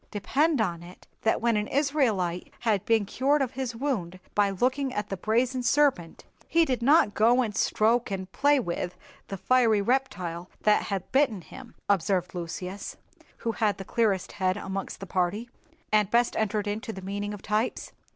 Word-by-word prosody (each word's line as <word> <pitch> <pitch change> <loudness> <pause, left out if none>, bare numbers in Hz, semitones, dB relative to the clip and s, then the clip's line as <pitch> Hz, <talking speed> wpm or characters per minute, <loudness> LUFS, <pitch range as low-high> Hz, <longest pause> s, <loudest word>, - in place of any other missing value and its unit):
"Depend 285 +8 +1
upon 175 -6 -1
it, 175 +1 -13 0.2
that 225 - +1
when 235 -1 +2
an 210 0 0
Israelite 240 - 0
had 215 -5 +1
been 225 -2 +3
cured 275 +8 +1
of 265 -3 -1
his 255 -3 -4
wound 215 -9 -3
by 205 -1 +3
looking 255 +7 0
at 210 0 -3
the 195 - -2
brazen 240 +6 0
serpent, 250 - +1 0.2
he 335 0 +3
did 255 -5 -1
not 275 -4 +4
go 240 +4 +4
and 215 -3 -4
stroke 230 +4 +2
and 190 -1 -5
play 285 0 +3
with 175 -4 -3 0.3
the 195 - -5
fiery 230 0 +3
reptile 200 -8 -1
that 210 0 +4
had 195 -2 -4
bitten 260 -8 +2
him," 255 +7 -13
observed 185 -2 +1
Lucius, 180 +3 -6 0.4
who 230 - -2
had 215 -2 0
the 195 - -7
clearest 210 -5 0
head 185 0 0
amongst 195 -1 -5
the - - -5
party, 195 +6 -1 0.4
and 210 -2 +3
best 235 +2 +2
entered 210 -1 0
into 220 +3 -3
the 190 -3 -9
meaning 205 +2 -3
of 205 -2 -8
types. 215 +3 -1
215 Hz, 175 wpm, -27 LUFS, 190-250 Hz, 0.4 s, not